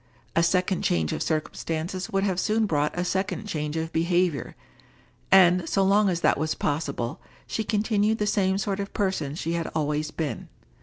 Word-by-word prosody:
A 165 - +4
second 180 +2 +1
change 80 -3 +1
of - - -3
circumstances 165 +4 -2
would 195 -3 0
have 190 -3 0
soon 220 +3 +2
brought 150 -4 0
a 175 - 0
second 190 +2 -2
change 150 -5 -3
of 160 0 -3
behavior; 170 -4 0 0.8
and, 180 -2 +6
so 195 - +2
long 200 +1 +4
as 175 -2 -1
that - - +3
was 155 +1 -1
possible, 140 -5 -2 0.2
she 220 - -2
continued 215 0 +1
the 210 - 0
same 195 -2 +1
sort 200 0 -2
of 200 0 -4
person 185 -8 -1
she 165 0 -3
had 170 -1 -1
always 150 0 0
been. 150 -8 -4
180 Hz, 175 wpm, -26 LUFS, 155-195 Hz, 0.8 s, and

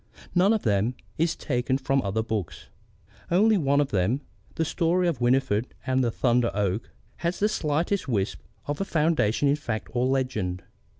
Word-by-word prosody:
None 185 +3 +4
of 220 -2 +1
them 105 +3 +1 0.2
is 165 +1 +2
taken 130 -1 -1
from 135 0 +1
other 105 +2 -1
books. 110 -6 -4 0.6
Only 215 +5 +4
one 140 -6 +2
of 145 -2 +1
them 105 +8 +1 0.3
the 160 - 0
story 175 +3 +1
of 160 -8 -1
Winifried 125 -2 +1
and 130 0 +2
the 120 - +2
Thunder 120 0 +2
Oak 105 +1 -1 0.3
has 170 +2 -2
the 210 - +2
slightest 170 -1 -1
wisp 105 -5 -1 0.3
of 145 +3 -3
a - - +2
foundation 150 - +1
in 140 +1 +3
fact 115 -7 -4
or 125 0 +1
legend. 110 -10 -1
130 Hz, 170 wpm, -26 LUFS, 110-160 Hz, 0.6 s, None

